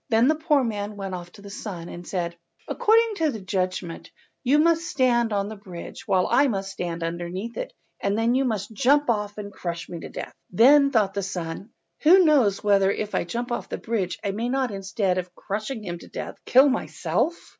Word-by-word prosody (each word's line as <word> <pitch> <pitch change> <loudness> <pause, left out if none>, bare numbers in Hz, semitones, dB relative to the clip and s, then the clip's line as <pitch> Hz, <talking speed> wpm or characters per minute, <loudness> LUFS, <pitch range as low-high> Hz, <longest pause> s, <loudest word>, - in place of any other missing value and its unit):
Then 230 +1 +4
the - - +5
poor 305 -3 +2
man 210 -2 -3
went 195 -1 -5
off 175 -1 -6
to 200 - -14
the 200 - -9
son, 185 -5 -6
and 175 0 -9
said— 175 -2 -2 0.3
"According 455 +1 +3
to 320 -2 +2
the 225 - -4
judgment 185 -3 -3 0.3
you 270 +3 +4
must 330 +2 +3
stand 240 -4 +2
on 200 -1 0
the 220 - -6
bridge 190 +1 -9
while 190 -3 +3
I 285 - +5
must 195 -5 -2
stand 170 -3 -4
underneath 175 +7 -4
it, - - -4 0.3
and 200 +1 0
then 230 +2 +2
you 265 +2 +2
must 220 -5 -2
jump 275 +4 +3
off 210 -2 -3
and 205 -1 -7
crush 170 -2 -5
me 170 - -6
to - - -8
death." - - -7 0.2
Then 275 +8 +6
thought 210 -7 +2
the 200 - -1
son— 180 +1 -5 0.3
"Who 360 +4 +7
knows 255 -11 +3
whether 200 -2 +4
if 210 +1 -2
I - - 0
jump 240 +7 -4
off 240 - -3
the - - -3
bridge 210 -6 -2
I 200 - 0
may 225 +5 -2
not, 260 -2 0
instead 195 -1 -1
of 180 -1 -7
crushing 215 +3 -4
him 175 -3 -5
to - - -13
death, - - -7
kill 265 +3 +7
myself?" 310 +4 0
210 Hz, 210 wpm, -25 LUFS, 185-255 Hz, 0.3 s, Who